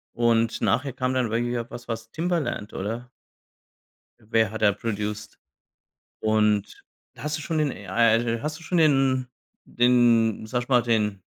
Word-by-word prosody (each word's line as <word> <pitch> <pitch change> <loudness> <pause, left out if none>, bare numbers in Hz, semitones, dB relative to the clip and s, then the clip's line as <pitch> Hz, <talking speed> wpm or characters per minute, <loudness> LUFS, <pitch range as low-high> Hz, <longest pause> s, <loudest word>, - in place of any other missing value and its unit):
Und 115 -1 +1
nachher 130 +3 +1
kam 130 +1 -1
dann 125 -3 0
wirklich 120 +1 -1
auch 115 - -6
was 120 - -9
was 115 -1 -5
Timbaland, 165 - -2
oder? 115 +5 -5 1.1
Wer 110 0 +1
hat 110 - -6
da 105 - +6
produced? 105 0 -4 0.8
Und 105 -2 +1 0.3
hast 150 +5 -3
du 155 - -7
schon 160 +1 -2
den 150 -2 +1 0.2
ah, 115 +3 +4
äh, 115 0 -1
hast 155 +1 -4
du - - -15
schon 175 +2 -1
den 135 -4 +3 0.4
den 120 -3 +3
sage 120 +2 -2
ich - - -26
mal, 125 -3 +4
den 105 -4 0
115 Hz, 160 wpm, -25 LUFS, 110-130 Hz, 1.1 s, da